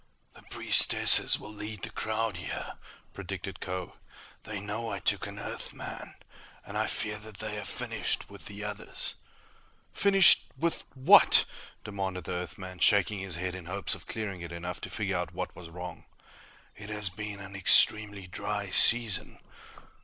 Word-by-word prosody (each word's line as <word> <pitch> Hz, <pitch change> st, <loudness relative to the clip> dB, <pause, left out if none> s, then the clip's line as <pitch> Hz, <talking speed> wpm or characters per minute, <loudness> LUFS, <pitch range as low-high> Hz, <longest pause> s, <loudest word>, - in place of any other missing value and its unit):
"The -, -, -16 dB
priestesses -, -, +5 dB
will 105 Hz, -, -10 dB
lead 105 Hz, -1 st, -7 dB
the -, -, -5 dB
crowd 110 Hz, -2 st, -3 dB
here," 90 Hz, -, -6 dB, 0.4 s
predicted 95 Hz, 0 st, -7 dB
Kho. 90 Hz, -1 st, -6 dB, 0.5 s
"They 105 Hz, -2 st, -5 dB
know 105 Hz, +3 st, -5 dB
I 100 Hz, -, -4 dB
took 95 Hz, -, 0 dB
an -, -, -9 dB
Earthman, -, -, -8 dB, 0.5 s
and -, -, -10 dB
I -, -, 0 dB
fear 105 Hz, 0 st, -3 dB
they 110 Hz, 0 st, -8 dB
have 105 Hz, -, -5 dB
finished -, -, -2 dB
with -, -, -11 dB
the 100 Hz, +1 st, -8 dB
others." 105 Hz, -1 st, -4 dB, 0.8 s
"Finished 195 Hz, -3 st, +6 dB
with 170 Hz, 0 st, -2 dB
What?" 130 Hz, 0 st, +7 dB, 0.4 s
demanded 95 Hz, -3 st, -5 dB
the 95 Hz, -, -7 dB
Earthman, 90 Hz, +1 st, -6 dB
shaking 100 Hz, 0 st, +3 dB
his 95 Hz, -3 st, -3 dB
head 90 Hz, +1 st, -4 dB
in 95 Hz, -2 st, -8 dB
hopes 100 Hz, +2 st, -1 dB
of -, -, -9 dB
clearing 100 Hz, -5 st, -5 dB
it 85 Hz, -, -8 dB
enough 85 Hz, +1 st, -6 dB
to -, -, -6 dB
figure 100 Hz, -4 st, -2 dB
out 90 Hz, -, -5 dB
what -, -, -5 dB
was 85 Hz, -2 st, -11 dB
wrong. 90 Hz, 0 st, -9 dB, 0.7 s
"It 105 Hz, 0 st, -10 dB
has 105 Hz, -3 st, -1 dB
been 105 Hz, +1 st, -7 dB
an 95 Hz, 0 st, -10 dB
extremely 100 Hz, +1 st, +4 dB
dry 100 Hz, +1 st, -5 dB
season." 115 Hz, -2 st, +4 dB
100 Hz, 155 wpm, -29 LUFS, 90-105 Hz, 0.8 s, What